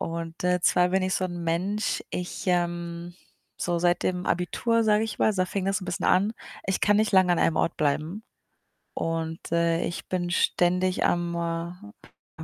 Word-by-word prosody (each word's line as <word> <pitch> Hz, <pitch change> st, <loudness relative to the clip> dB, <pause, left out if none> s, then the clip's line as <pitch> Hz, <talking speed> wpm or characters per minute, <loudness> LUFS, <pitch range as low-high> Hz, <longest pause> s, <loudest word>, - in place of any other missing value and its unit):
Und, 165 Hz, 0 st, -5 dB
äh, 180 Hz, 0 st, +2 dB
zwar 180 Hz, 0 st, +4 dB
bin 190 Hz, +1 st, +1 dB
ich 185 Hz, -, 0 dB
so 185 Hz, -, 0 dB
'n 175 Hz, -1 st, -5 dB
Mensch, 185 Hz, +6 st, -1 dB
ich, 180 Hz, 0 st, -5 dB
ähm 175 Hz, -1 st, -1 dB, 0.4 s
so 175 Hz, -1 st, -1 dB
seit 175 Hz, 0 st, +2 dB
dem 180 Hz, 0 st, -1 dB
Abitur, 230 Hz, +6 st, +1 dB
sage 215 Hz, 0 st, +3 dB
ich 220 Hz, -, -6 dB
mal, 215 Hz, -, +3 dB
da 185 Hz, -2 st, +1 dB
fing 195 Hz, +1 st, -3 dB
das 195 Hz, +1 st, 0 dB
'n -, -, -6 dB
bisschen 175 Hz, -, -2 dB
an, 200 Hz, +4 st, +3 dB, 0.3 s
ich 190 Hz, -, -1 dB
kann 205 Hz, 0 st, +4 dB
nicht 215 Hz, 0 st, +1 dB
lang 185 Hz, -1 st, +5 dB
an 175 Hz, -, +3 dB
einem 165 Hz, -, +2 dB
Ort -, -, 0 dB
bleiben 155 Hz, +7 st, -1 dB, 0.7 s
und, 165 Hz, 0 st, -2 dB
äh, 170 Hz, 0 st, +2 dB
ich 170 Hz, -, -5 dB
bin 175 Hz, -1 st, -1 dB
ständig 180 Hz, +1 st, +2 dB
am, 175 Hz, 0 st, 0 dB, 1.0 s
äh, -, -, -5 dB
180 Hz, 185 wpm, -26 LUFS, 170-190 Hz, 1.0 s, lang